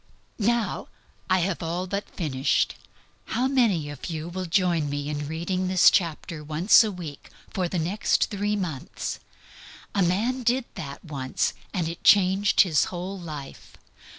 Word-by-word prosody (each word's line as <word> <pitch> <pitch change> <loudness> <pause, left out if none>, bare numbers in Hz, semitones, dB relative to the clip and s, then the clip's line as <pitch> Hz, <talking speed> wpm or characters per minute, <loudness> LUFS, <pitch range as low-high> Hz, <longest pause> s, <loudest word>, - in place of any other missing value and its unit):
Now 230 +1 0 0.4
I 185 0 +4
have 180 0 -1
all 170 +2 -2
but 200 +2 -4
finished. 140 -6 0 0.5
How 250 +3 0
many 225 - +2
of 145 - -7
you 160 0 -4
will 185 +1 -4
join 170 -4 +2
me 145 0 -3
in 145 -1 -3
reading 175 +4 -2
this 185 -1 +6
chapter 165 -3 -1
once 160 +10 +5
a 215 - -1
week 165 -6 -8 0.2
for 185 -2 0
the 180 - -2
next 180 +8 +1
three 205 0 0
months? 170 -10 -4 0.7
A 200 - +1
man 215 +9 +1
did 245 +1 +1
that 140 +2 -8
once 135 -4 -1 0.2
and 175 -5 -1
it 165 +1 -7
changed 195 0 +5
his 160 -7 +3
whole 185 +2 -5
life. 150 -5 -9
180 Hz, 150 wpm, -26 LUFS, 155-200 Hz, 0.7 s, this